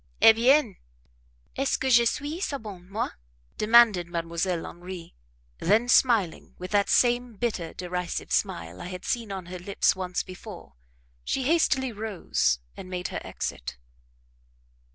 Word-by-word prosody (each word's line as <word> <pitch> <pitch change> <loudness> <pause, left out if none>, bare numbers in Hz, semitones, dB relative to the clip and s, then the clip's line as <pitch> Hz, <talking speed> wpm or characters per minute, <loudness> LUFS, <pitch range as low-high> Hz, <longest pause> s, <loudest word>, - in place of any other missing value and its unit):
"Eh 225 - +9
bien! 240 -2 +3 0.8
est 270 0 0
ce - - +3
que 265 - -2
je 235 -1 +6
suis 290 +7 -2
sa 295 -7 -2
bonne 195 -6 -10
moi?" 215 +4 -2 0.5
demanded 215 -5 +5
Mdlle. 170 +1 -2
Henri; 175 0 -9 0.5
then 215 +7 +3
smiling, 230 -9 +2
with 185 +1 -7
that 205 -1 +2
same 245 -1 +2
bitter, 195 -7 -2
derisive 180 -1 -4
smile 190 -4 -1
I 175 - -6
had 180 0 -7
seen 230 -4 -2
on 190 -2 -5
her 180 +1 -7
lips 195 +3 +1
once 185 -1 -2
before, 185 - -11 0.5
she 265 - -1
hastily 270 -3 +2
rose 210 - 0 0.2
and 185 - -9
made 180 -1 -3
her - - -4
exit. - - -5
200 Hz, 145 wpm, -26 LUFS, 180-240 Hz, 0.8 s, Eh